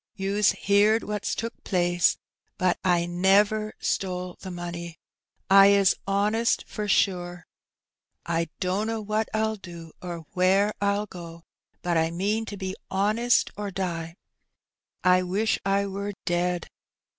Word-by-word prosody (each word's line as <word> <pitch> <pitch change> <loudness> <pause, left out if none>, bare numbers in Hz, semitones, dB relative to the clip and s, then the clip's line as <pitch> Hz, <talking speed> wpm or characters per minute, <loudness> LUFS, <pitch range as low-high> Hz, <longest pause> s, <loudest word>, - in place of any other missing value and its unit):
Ton's 200 +1 +2
heerd 205 +3 +3
what^s 210 0 -3
took 230 +1 -6
plaas, 175 -2 +2 0.4
but 185 -1 +1
I 175 -2 +2
newer 200 +5 +2
stole 180 -1 -2
the 190 - -8
money. 170 -1 -6 0.5
I 195 0 +8
is 200 -2 +4
'onest 210 +4 +1
for 210 -1 -4
shure; 175 -3 0 0.8
I 165 -1 -1
dunno 210 +4 -1
wat 215 +1 -1
VYL 220 -1 -1
do 170 -3 -10
or 170 -3 -6
whair 195 +3 +3
I'll 200 +1 +1
go; 170 -4 -10 0.4
but 175 -1 +1
I 160 0 +2
meen 205 +6 -1
to 205 - -7
be 190 -1 -4
'onest 215 +5 +2
or 205 0 -4
die. 170 -3 -4 0.9
I 185 0 +5
wish 195 +5 0
I 195 +1 +1
war 200 +1 -4
ded. 175 0 0
190 Hz, 135 wpm, -26 LUFS, 175-205 Hz, 0.9 s, I